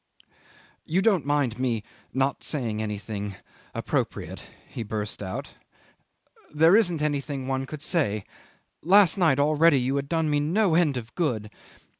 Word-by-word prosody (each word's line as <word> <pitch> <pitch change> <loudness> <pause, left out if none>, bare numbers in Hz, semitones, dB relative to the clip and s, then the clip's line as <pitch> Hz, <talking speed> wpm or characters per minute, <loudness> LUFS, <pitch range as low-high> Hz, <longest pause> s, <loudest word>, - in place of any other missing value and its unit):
"You 185 +4 0
don't 195 -10 +2
mind 140 -5 0
me 120 -4 0 0.3
not 135 +1 0
saying 115 -8 -1
anything 105 -1 -4 0.4
appropriate," - - -3 0.2
he - - -7
burst 105 -1 -4
out. 95 -2 -5 1.0
"There 160 +5 +5
isn't 175 -8 +2
anything 140 -2 -2
one 135 0 -2
could 150 0 -8
say. 120 - 0 0.6
Last 185 0 +5
night 165 -8 +3
already 150 0 +4
you 130 +2 0
had 140 0 -3
done 160 -1 +1
me 145 -1 +2
no 175 +5 +2
end 160 -5 +3
of 115 -2 -7
good. 115 - -2
140 Hz, 140 wpm, -26 LUFS, 115-160 Hz, 1.0 s, There